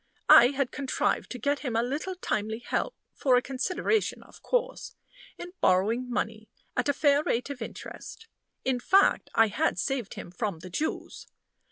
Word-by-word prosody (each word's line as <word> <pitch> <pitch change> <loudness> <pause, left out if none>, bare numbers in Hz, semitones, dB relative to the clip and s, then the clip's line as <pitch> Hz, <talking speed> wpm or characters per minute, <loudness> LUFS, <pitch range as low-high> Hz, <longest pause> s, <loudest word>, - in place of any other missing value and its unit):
I 240 - +10
had 275 -1 -1
contrived 275 -2 -1
to 250 - -5
get 285 +4 0
him 250 -6 -3
a 230 - +2
little 295 +9 -3
timely 220 - -2
help 245 - -2 0.2
for 260 -3 +2
a - - +3
consideration, 365 +10 -1
of - - -18
course - - -2 0.4
in 355 0 -8
borrowing 225 +7 +2
money 220 -3 -3 0.3
at 250 +3 0
a - - +3
fair 285 0 +3
rate 250 -1 -1
of 260 -4 -8
interest; 450 - -9 0.4
in 260 -1 +1
fact, 390 +10 +3
I 225 -1 +5
had 205 - 0
saved 245 +3 -2
him - - -8
from 200 -1 -3
the 180 +3 -11
Jews. 305 - -4
255 Hz, 170 wpm, -28 LUFS, 225-290 Hz, 0.4 s, I